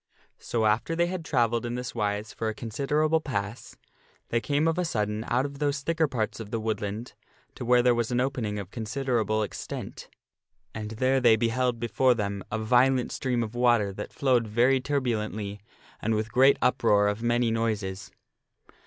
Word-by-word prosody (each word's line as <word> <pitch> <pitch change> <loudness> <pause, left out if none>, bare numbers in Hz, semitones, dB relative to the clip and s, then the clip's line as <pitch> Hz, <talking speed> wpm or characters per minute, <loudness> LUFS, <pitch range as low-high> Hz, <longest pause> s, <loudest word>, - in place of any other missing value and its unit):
So 115 -2 -1
after 110 +10 +1
they 170 +1 +2
had 180 -1 -4
travelled 120 -6 +1
in 120 0 -3
this 125 0 -5
wise 105 -1 -2
for 110 - -2
a 110 - -5
considerable 150 +8 0
pass 105 -6 -4 0.5
they 115 - +1
came 145 +4 +1
of 165 +2 +1
a - - +2
sudden 105 -8 -1
out 125 +3 +1
of 140 -1 -7
those 145 -1 0
thicker 165 +2 +1
parts 115 -6 -2
of 110 -2 -7
the 115 0 -2
woodland 110 +1 -3 0.4
to - - -7
where 120 0 +4
was 120 -1 -1
an 125 -1 0
opening 125 -5 -1
of 100 -2 -6
considerable 115 -2 -1
extent. 105 - -7 0.6
And 105 -1 -5
there 130 +4 +1
they 120 -3 +6
beheld 120 +2 0
before 120 +2 +2
them 100 -3 -3
a 110 - -1
violent 125 +3 +3
stream 125 -3 -1
of 110 0 -6
water 120 -5 +2
that - - -7
flowed 125 -4 +1
very 120 +5 +3
turbulently 110 -7 -2 0.4
and 110 +1 0
with 110 +1 -2
great 135 +2 +5
uproar 110 -5 +3
of 105 +2 -1
many 120 0 +1
noises. 105 -4 -2
120 Hz, 175 wpm, -27 LUFS, 110-130 Hz, 0.6 s, they